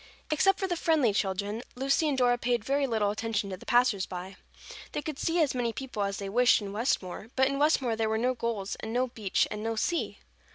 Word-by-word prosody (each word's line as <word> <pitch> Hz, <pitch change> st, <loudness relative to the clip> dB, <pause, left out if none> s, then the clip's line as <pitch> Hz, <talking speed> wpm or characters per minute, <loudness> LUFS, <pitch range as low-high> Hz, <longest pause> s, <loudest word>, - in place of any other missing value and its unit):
Except 385 Hz, +6 st, +3 dB
for 385 Hz, -, 0 dB
the 355 Hz, -, -1 dB
friendly 310 Hz, -10 st, +2 dB
children, 205 Hz, +2 st, -1 dB
Lucy 275 Hz, +4 st, +1 dB
and 275 Hz, -, 0 dB
Dora 245 Hz, -1 st, +3 dB
paid 240 Hz, -3 st, 0 dB
very 275 Hz, +2 st, +1 dB
little 215 Hz, -4 st, +1 dB
attention 215 Hz, -2 st, -2 dB
to 185 Hz, -, -5 dB
the -, -, -15 dB
passers 240 Hz, -6 st, +3 dB
by. 185 Hz, +1 st, -7 dB, 0.6 s
They -, -, -2 dB
could 305 Hz, -3 st, -5 dB
see 335 Hz, +1 st, 0 dB
as 295 Hz, -6 st, +3 dB
many 245 Hz, -2 st, -1 dB
people 255 Hz, -3 st, -5 dB
as 200 Hz, -1 st, -1 dB
they 200 Hz, -, -5 dB
wished 245 Hz, +5 st, +4 dB
in 200 Hz, -2 st, -6 dB
Westmore, 215 Hz, -3 st, -2 dB
but 265 Hz, 0 st, +4 dB
in 275 Hz, 0 st, -2 dB
Westmore 275 Hz, -6 st, +2 dB
there 220 Hz, 0 st, 0 dB
were 220 Hz, -, +1 dB
no 250 Hz, +3 st, +1 dB
gulls 230 Hz, -5 st, -3 dB
and 220 Hz, +1 st, -5 dB
no 250 Hz, +1 st, +2 dB
beach 220 Hz, -6 st, 0 dB
and 210 Hz, -, -4 dB
no 225 Hz, 0 st, -1 dB
sea. 335 Hz, +10 st, -1 dB
235 Hz, 230 wpm, -29 LUFS, 205-270 Hz, 0.6 s, wished